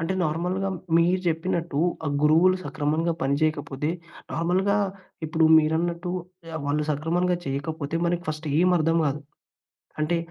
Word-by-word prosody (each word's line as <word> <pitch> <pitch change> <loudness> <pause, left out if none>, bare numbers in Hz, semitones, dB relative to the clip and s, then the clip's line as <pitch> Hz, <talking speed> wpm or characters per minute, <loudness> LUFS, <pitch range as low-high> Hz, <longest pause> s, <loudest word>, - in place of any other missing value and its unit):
అంటే 165 +3 -1
నార్మల్‌గా 180 +4 -1 0.3
మీరు 175 +2 +3
చెప్పినట్టు 165 -2 -1 0.3
ఆ - - +1
గురువులు 165 +5 +5
సక్రమంగా 155 +3 0
పనిచేయకపోతే, 145 +1 0 0.4
నార్మల్‌గా 185 +5 +1 0.5
ఇప్పుడు 160 +1 +2
మీరన్నట్టు 170 +3 0 0.4
ఆహ్, 160 - -2
వాళ్ళు 150 +1 0
సక్రమంగా 175 +5 0
చేయకపోతే 145 +3 -3
మనకి 175 0 0
ఫస్ట్ 155 0 -3
ఏం 180 +1 +4
అర్థం 165 +1 +2
కాదు. 145 +2 -2 0.8
అంటే 165 +3 +1
165 Hz, 120 wpm, -25 LUFS, 150-175 Hz, 0.8 s, గురువులు